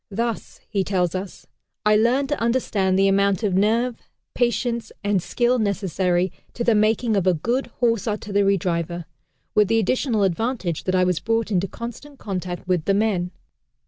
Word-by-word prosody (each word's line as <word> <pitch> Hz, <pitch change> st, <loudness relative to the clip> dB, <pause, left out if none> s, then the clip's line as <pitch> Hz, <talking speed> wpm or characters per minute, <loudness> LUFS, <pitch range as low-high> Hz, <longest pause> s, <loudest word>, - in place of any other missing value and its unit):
"Thus," 230 Hz, +2 st, -3 dB
he 200 Hz, -2 st, 0 dB
tells 180 Hz, -3 st, 0 dB
us, 185 Hz, 0 st, -6 dB, 0.4 s
"I 210 Hz, 0 st, +5 dB
learned 250 Hz, +6 st, +2 dB
to 295 Hz, -, -1 dB
understand 215 Hz, -6 st, +1 dB
the 195 Hz, 0 st, +4 dB
amount 200 Hz, +1 st, +2 dB
of 200 Hz, -3 st, +1 dB
nerve, 225 Hz, +5 st, +2 dB, 0.4 s
patience 235 Hz, -1 st, 0 dB
and 205 Hz, -2 st, +1 dB
skill 245 Hz, +6 st, +1 dB
necessary 185 Hz, -3 st, 0 dB, 0.2 s
to 240 Hz, -, -2 dB
the 235 Hz, -, +4 dB
making 215 Hz, +1 st, +2 dB
of 190 Hz, -2 st, +1 dB
a 185 Hz, -, +4 dB
good 240 Hz, -, -1 dB
Horse 230 Hz, -4 st, +2 dB
Artillery 200 Hz, -2 st, +1 dB
driver, 170 Hz, -1 st, -2 dB, 0.5 s
with 210 Hz, -1 st, +4 dB
the 225 Hz, +2 st, +2 dB
additional 225 Hz, 0 st, +1 dB
advantage 195 Hz, -, -1 dB
that 185 Hz, -, +1 dB
I 185 Hz, -, +4 dB
was 180 Hz, -2 st, +1 dB
brought 225 Hz, -1 st, -1 dB
into 190 Hz, 0 st, +1 dB
constant 240 Hz, +8 st, -8 dB
contact 185 Hz, -4 st, -5 dB
with 180 Hz, -4 st, +1 dB
the 195 Hz, -, +2 dB
men." 200 Hz, -4 st, +1 dB
205 Hz, 170 wpm, -23 LUFS, 185-230 Hz, 0.5 s, I